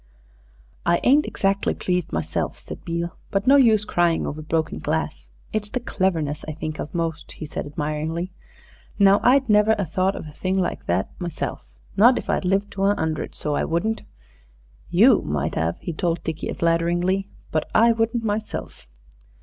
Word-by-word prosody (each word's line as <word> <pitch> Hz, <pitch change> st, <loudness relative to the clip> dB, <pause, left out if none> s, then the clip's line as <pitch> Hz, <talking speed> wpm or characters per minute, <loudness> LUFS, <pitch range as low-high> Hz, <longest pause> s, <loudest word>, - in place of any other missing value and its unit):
"I 170 Hz, 0 st, +3 dB
ain't 285 Hz, +4 st, +4 dB
exactly 195 Hz, 0 st, 0 dB
pleased 180 Hz, -2 st, -1 dB
myself," 80 Hz, 0 st, -2 dB
said -, -, -10 dB
Beale, 170 Hz, 0 st, -3 dB
"but 195 Hz, 0 st, 0 dB
no 275 Hz, -, +7 dB
use 225 Hz, -6 st, +5 dB
crying 175 Hz, -4 st, +1 dB
over 155 Hz, +1 st, -4 dB
broken 160 Hz, +1 st, -1 dB
glass. -, -, -3 dB, 0.2 s
It's 210 Hz, -1 st, -2 dB
the 250 Hz, -, -2 dB
cleverness 165 Hz, -, -1 dB
I 155 Hz, -, -3 dB
think 155 Hz, 0 st, -5 dB
of 155 Hz, -, -6 dB
most," 165 Hz, -1 st, -3 dB
he -, -, -7 dB
said 150 Hz, -, -5 dB
admiringly. 155 Hz, +3 st, -3 dB, 0.7 s
"Now 200 Hz, 0 st, +6 dB
I'd 265 Hz, +1 st, +4 dB
never 210 Hz, 0 st, +5 dB
a 200 Hz, -, 0 dB
thought 185 Hz, +4 st, 0 dB
of -, -, -6 dB
a 155 Hz, -, -9 dB
thing 185 Hz, +5 st, -2 dB
like 185 Hz, -, -2 dB
that 90 Hz, +3 st, 0 dB
myself 170 Hz, -, -4 dB, 0.3 s
not 240 Hz, +5 st, +7 dB
if -, -, -2 dB
I'd -, -, 0 dB
lived 195 Hz, +2 st, +1 dB
to 195 Hz, 0 st, -1 dB
a 205 Hz, +1 st, +4 dB
hundred, 160 Hz, -3 st, -3 dB
so 150 Hz, -, -2 dB
I -, -, 0 dB
wouldn't. 215 Hz, +7 st, -1 dB, 0.9 s
You -, -, +6 dB
might 75 Hz, +1 st, -2 dB
'ave," 80 Hz, +1 st, 0 dB
he 170 Hz, -, -4 dB
told 170 Hz, 0 st, -1 dB
Dickie 160 Hz, -1 st, -3 dB
flatteringly, 175 Hz, +3 st, +1 dB, 0.2 s
"but 155 Hz, -, -1 dB
I 230 Hz, +1 st, +6 dB
wouldn't 230 Hz, +1 st, 0 dB
myself." 215 Hz, -, -4 dB
175 Hz, 175 wpm, -23 LUFS, 155-205 Hz, 0.9 s, no